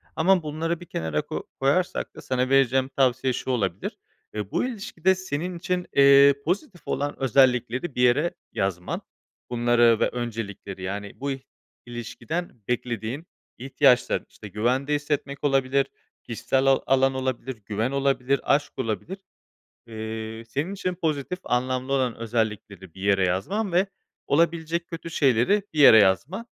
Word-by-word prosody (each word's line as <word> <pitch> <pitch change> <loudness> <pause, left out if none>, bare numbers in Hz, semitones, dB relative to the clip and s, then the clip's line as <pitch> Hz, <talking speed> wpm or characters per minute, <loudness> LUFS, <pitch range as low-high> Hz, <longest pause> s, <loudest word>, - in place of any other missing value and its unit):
ama 180 +2 +3
bunları 160 +2 -2
bir 175 - -10
kenara 80 - -2
ko - - -6
koyarsak 145 +7 0
da - - -9
sana 130 0 -1
vereceğim 135 -1 +3
tavsiye 130 -1 +2
şu 130 - -3
olabilir: 100 -6 -2 0.4
E, 105 -2 -5
bu - - +1
ilişkide 200 -7 0
senin 180 -1 -4
için, 180 +1 -2
eee, 140 0 +7
pozitif 185 - -2
olan 145 +1 -2
özellikleri 130 +2 +2
bir 125 - 0
yere 130 +7 +3 0.2
yazman. 90 -2 -2 0.5
Bunları 120 -1 +3
ve - - +2
öncelikleri, 110 -5 -5
yani, 100 +2 -4
bu 140 +1 -2
i 135 -1 -6 0.4
ilişkiden 120 +5 -6
beklediğin 125 +4 -3 0.3
ihtiyaçların, 125 -1 +2
işte, 105 - -11
güvende 125 +8 0
hissetmek 145 -1 -3
olabilir, 135 -1 +2 0.4
kişisel 120 +3 -1
ala 135 0 +3
alan 135 0 +3
olabilir, 130 -1 -3
güven 110 +5 -1
olabilir, 140 -1 +1
aşk 145 +1 +1
olabilir. 130 - -3 0.7
Eee, 110 0 -6
senin 145 +10 -2
için 185 -2 -2
pozitif 160 0 -2
anlamlı 130 +2 -1
olan 130 -4 +1
özellikleri 105 -5 -3
bir 95 - -12
yere 100 -1 +3
yazman 185 - -1
ve 180 +3 +3 0.4
olabilecek 170 +2 +1
kötü 165 0 -7
şeyleri 140 - +3
bir - - -4
yere 110 -6 +9
yazman. 120 - +2
130 Hz, 140 wpm, -25 LUFS, 115-155 Hz, 0.7 s, yere